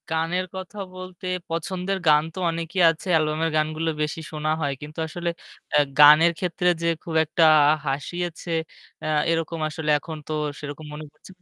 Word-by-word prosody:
গানের 165 +3 0
কথা 185 +1 -8 0.2
বলতে, 185 0 -9 0.2
পছন্দের 180 +3 -2
গান 150 0 +6
তো 185 - -7
অনেকই 165 +2 -4
আছে। 165 +3 -4
অ্যালবাম-এর 155 0 +1
গানগুলো 155 +1 0
বেশি 150 +2 -2
শোনা 155 0 -2
হয়। 140 -2 0
কিন্তু 150 +2 -9
আসলে 170 +2 -3 0.4
অ্যা - - +4 0.2
গানের 150 +3 +8
ক্ষেত্রে 180 0 -1
যে 170 - 0 0.2
খুব 165 - -5
একটা 160 +2 +1 0.4
হাসিয়েছে, 170 +5 -3 0.5
অ্যা - - -3 0.2
এরকম 165 0 -2
আসলে 155 0 -4
এখন 160 +2 -7
তো 155 - -3 0.3
সেরকম 150 +1 -7
মনে 150 +1 -7
পড়ছেনা 185 +3 -18
165 Hz, 160 wpm, -24 LUFS, 155-175 Hz, 0.5 s, গানের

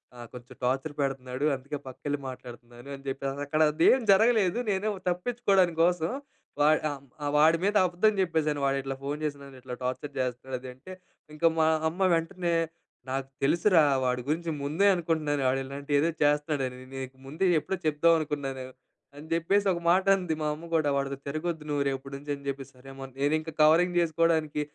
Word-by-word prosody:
ఆహ్, 120 -1 -9
కొంచెం 125 0 -11
టార్చర్ 135 +4 0
పెడతనాడు. 135 0 -2
అందుకే 140 +3 -6
పక్కకెళ్ళి 145 +2 -4
మాట్లాడుతనాను." 120 0 -11
అని 135 - -14
జెప్పి 135 +1 -3
అస్ 140 +1 -6
అక్కడదేం 155 - +3
జరగలేదు. 220 0 +4
నేనేమో 200 0 -1
తప్పించుకోడానికోసం, 180 -4 +1 0.5
వాడ్ 155 +1 +4
ఆహ్, 145 - -5
హ్మ్, 135 0 -23
ఆహ్, 145 0 -1
వాడి 160 +2 +5
మీద 205 +1 +1
అబద్ధం 185 +5 +2
చెప్పేసాను. 155 -5 0
"వాడిట్లా 135 -1 -2
ఫోన్ 145 +2 -3
చేసి 145 -2 -3
నన్నిట్లా 130 -2 -9
టార్చర్ 130 +3 -4
జేస్తనాడు 130 +1 -4
అది" 130 0 -8
అంటే, 170 +9 -11 0.4
ఇంకా 165 +2 +3
మా 160 - +4 0.2
అమ్మ 185 +4 0
వెంటనే 170 +1 -1 0.6
"నాకు 135 0 -2 0.2
తెలుసురా! 170 +2 +4 0.2
వాడి 125 0 0
గురించి 165 +2 -1
ముందే 155 +8 +1
అనుకుంటున్నాను. 155 -4 -1
ఆడిలాంటి 140 +2 -5
ఏదో 160 +3 +2
చేస్తనాడని, 145 -3 0
నీకు 130 0 -7
ముందే 160 +8 -1 0.2
ఎప్పుడో 190 - -3
చెప్దాం 155 +2 +4
అనుకున్నాను." 140 -3 -4 0.5
అని 145 +2 -10
జెప్పేసొక 185 +2 +2
మాటంది 185 -1 +3
మా - - -1
అమ్మ 160 +3 -9
కూడా. 155 -3 +2
"వాడితో 140 0 -2
తిరగొద్దు 155 +2 -3
నువ్వు 145 -1 +1
రేపుడి 135 0 -4
నుంచి" 145 +1 -13
అని 140 - -14
జెప్పే, 135 0 -3
సరే! 130 +1 -18
అమ్మా. 135 0 -8
నేనింక 155 +3 0
కవరింగ్ 170 +4 +5
జేసుకోడానికి. 160 -2 +1
150 Hz, 160 wpm, -28 LUFS, 135-170 Hz, 0.6 s, వాడి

